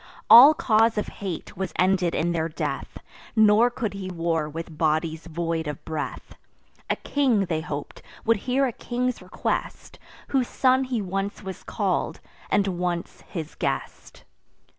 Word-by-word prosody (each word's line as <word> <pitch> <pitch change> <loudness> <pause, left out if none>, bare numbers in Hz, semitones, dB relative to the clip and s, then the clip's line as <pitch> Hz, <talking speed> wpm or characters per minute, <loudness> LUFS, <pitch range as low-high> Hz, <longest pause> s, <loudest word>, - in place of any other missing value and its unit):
All 275 +7 +11
cause 225 -7 +3
of 210 - -1
hate 185 -5 -5
was 190 +1 -4
ended 180 -2 +2
in 170 +1 +1
their 165 -1 -1
death; 150 -3 -4 0.4
Nor 220 +2 +6
could 235 -4 -3
he 195 -1 -5
war 165 -3 -1
with 165 +1 -7
bodies 160 +1 0
void 165 -1 -2
of 150 -1 -6
breath. 155 -2 -5 0.6
A - - +2
king, 255 -9 +1
they 160 -3 -1
hop'd, 150 -4 -6 0.2
would 230 -1 +4
hear 260 +6 +1
a 255 - -1
king's 250 +2 -3
request, - - -4 0.3
Whose 260 -3 +1
son 260 0 +2
he 245 -5 -2
once 195 +2 -3
was 190 -1 -7
call'd, - - -2 0.3
and 200 -1 +2
once 175 -1 -3
his 160 -4 -6
guest. - - -4
190 Hz, 150 wpm, -25 LUFS, 165-230 Hz, 0.6 s, All